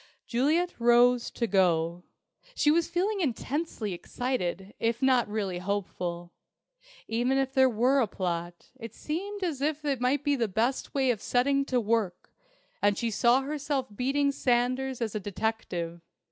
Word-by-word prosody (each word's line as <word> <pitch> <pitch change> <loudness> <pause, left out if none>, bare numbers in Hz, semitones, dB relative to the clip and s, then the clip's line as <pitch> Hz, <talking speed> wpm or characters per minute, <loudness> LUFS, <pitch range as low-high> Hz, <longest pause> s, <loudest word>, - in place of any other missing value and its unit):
Juliet 310 +9 +1
rose 240 +1 +4
to 235 - -2
go. 175 -4 +2 0.5
She 295 - +3
was 335 +1 +2
feeling 390 +3 0
intensely 265 - -2
excited, 190 -2 -3
if 230 +1 0
not 260 -3 +3
really 200 -4 -2
hopeful. 180 -3 -4 0.7
Even 245 +4 +1
if 270 0 0
there 265 -1 +5
were 250 +4 +2
a 230 - +2
plot, 175 -2 -4
it 230 -1 -8
seemed 395 +6 -4
as 315 -7 -2
if 300 +1 -1
this 280 -4 0
might 260 +3 +1
be 290 -1 +2
the 235 -4 0
best 230 +9 -1
way 265 -2 +3
of 220 -4 -4
setting 275 +3 +1
to 255 -2 +1
work, 215 -5 -1 0.5
and 205 0 +3
she 235 -1 -1
saw 240 +5 +4
herself 280 -4 -3
beating 280 +4 +1
Sanders 255 0 0
as 220 - -3
a 215 - -2
detective. 185 -5 -3
245 Hz, 155 wpm, -28 LUFS, 205-275 Hz, 0.7 s, there